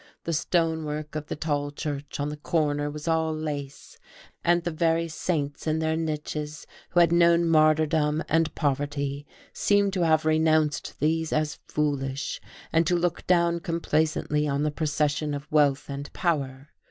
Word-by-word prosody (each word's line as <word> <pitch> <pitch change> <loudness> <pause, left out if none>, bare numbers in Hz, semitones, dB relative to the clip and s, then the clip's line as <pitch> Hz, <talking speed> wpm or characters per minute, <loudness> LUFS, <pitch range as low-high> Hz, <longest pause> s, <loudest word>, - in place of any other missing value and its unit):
The 165 - -2
stonework 155 -2 -1
of 155 -1 -5
the - - -3
tall 145 -2 -1
church 145 -1 -5
on 145 +1 -1
the 150 - -5
corner 145 -2 0
was 150 +2 -7
all 160 -1 +1
lace; 145 -3 -6 0.4
and 175 0 +3
the 175 - -2
very 165 +1 +1
saints 155 -3 -3
in 155 0 +1
their 160 0 0
niches, 150 -1 -4 0.2
who 175 - +2
had 170 -1 +4
known 170 0 +4
martyrdom 155 -1 +3
and 165 0 +1
poverty, 145 0 -2 0.3
seemed 200 -1 +2
to 185 - 0
have 155 -1 +3
renounced 155 -2 +1
these 160 +2 0
as 155 -1 -1
foolish, 140 -2 -2 0.3
and 165 0 +3
to 175 - +3
look 175 0 -1
down 170 -1 +3
complacently 155 -3 0
on 140 0 0
the 150 - +1
procession 150 -1 0
of 140 0 -6
wealth 145 -2 +3
and 140 +1 -6
power.. 140 -5 -2
155 Hz, 155 wpm, -26 LUFS, 145-165 Hz, 0.4 s, had